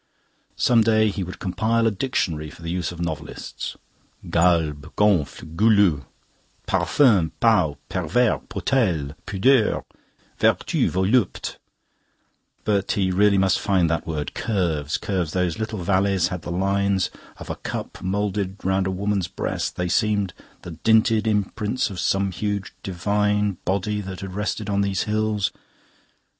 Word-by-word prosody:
Some 120 -2 +4
day 110 -1 +3
he 95 -1 -3
would 90 +1 -7
compile 110 +5 0
a 115 - +3
dictionary 90 - -2
for 80 - -14
the 85 - -3
use 90 -2 -2
of 85 - -10
novelists. 80 -3 -5 0.5
Galbe, 80 -4 +2
gonfle, 80 -6 +1
goulu: 100 - +4 0.6
parfum, 100 - +3
peau, 90 -11 +3
pervers, 95 +7 +1
potele, 85 - 0
pudeur: 110 +4 +3 0.6
vertu, - - +2
volupte. 95 +4 0 1.1
But 100 -2 +1
he 95 -2 +1
really 100 +2 +4
must 95 -1 +3
find 90 -5 +2
that 80 - -2
word. 75 -2 -3
Curves 85 -9 -1
curves...Those 90 -1 -1
little 110 -4 -3
valleys 95 -1 +2
had 90 -2 -4
the 85 - -6
lines 100 +1 +1 0.3
of - - -7
a - - -3
cup - - -6
moulded 100 0 -2
round 95 0 +1
a - - 0
woman's 100 -1 -1
breast; - - -3
they 90 - -1
seemed 100 -2 +1 0.3
the 90 - -7
dinted 110 +5 +3
imprints 105 +3 0
of 95 - -6
some 95 +2 +1
huge 100 +1 -3
divine 105 +1 0
body 100 +2 0
that 95 -1 -7
had 95 -1 -6
rested 105 +1 -3
on 100 -1 +1
these 100 -2 0
hills. 105 -2 0
95 Hz, 135 wpm, -23 LUFS, 90-105 Hz, 1.1 s, Some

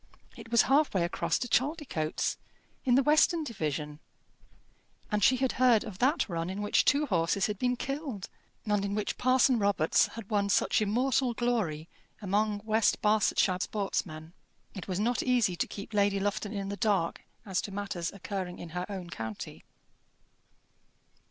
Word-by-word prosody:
It 230 -2 -11
was 235 -1 +5
half 285 -2 +2
way 180 - +2
across 170 -1 0
to 250 - -3
Chaldicotes 255 - -1 0.5
in 245 -2 +4
the 270 - +4
western 310 +3 +4
division; 150 - -4 1.1
and 210 -1 +1
she 255 +6 +5
had 265 0 +1
heard 240 -4 +5
of 205 -3 -9
that 275 +7 +2
run 170 -2 -3
in 195 +2 -4
which 205 - +2
two 290 +1 +3
horses 175 - +1
had 210 -2 -3
been 250 0 +1
killed, 275 - -5 0.4
and 210 -2 +1
in 200 0 -2
which 210 -1 -3
Parson 255 -1 +3
Robarts 200 -6 +3
had 230 -2 -9
won 200 -1 +1
such 200 - +2
immortal 245 +3 +1
glory 210 -11 -1 0.3
among 205 +1 0
West 220 0 +2
Barsetshire 210 -3 +2
sportsmen. 175 -6 -3 0.4
It 190 - -8
was 185 -1 -2
not 235 +3 +1
easy 240 -8 +2
to - - -1
keep 205 +2 -9
Lady 200 -1 +2
Lufton 205 +1 -2
in 200 -2 -4
the 200 - -4
dark 195 -7 0 0.2
as 190 -3 -1
to 205 - -7
matters 195 -4 -4
occurring 190 -2 -5
in 170 - -8
her 180 +2 -4
own 185 -4 -6
county. 110 -5 -7
205 Hz, 165 wpm, -29 LUFS, 185-245 Hz, 1.1 s, was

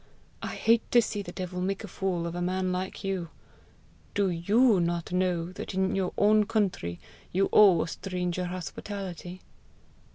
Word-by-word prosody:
I - - -4
hate 230 0 +2
to 240 - +8
see 215 -2 -1
the 175 - -7
devil 180 0 -5
make 195 +1 -2
a - - -6
fool 180 -3 -2
of 170 - -3
a 175 - -3
man 185 +1 0
like 185 +1 -4
you! 190 -4 -2 0.9
Do 200 -3 +2
YOU 205 +6 +4
not 170 0 -1
know 180 -2 0
that 185 - -6
in 190 0 +1
your 190 -2 0
own 210 0 +4
country 180 - -1 0.3
you 195 +2 +2
owe 195 -5 +7
a - - -5
stranger 180 0 -3
hospitality?" 185 +1 -6
185 Hz, 165 wpm, -28 LUFS, 175-195 Hz, 0.9 s, to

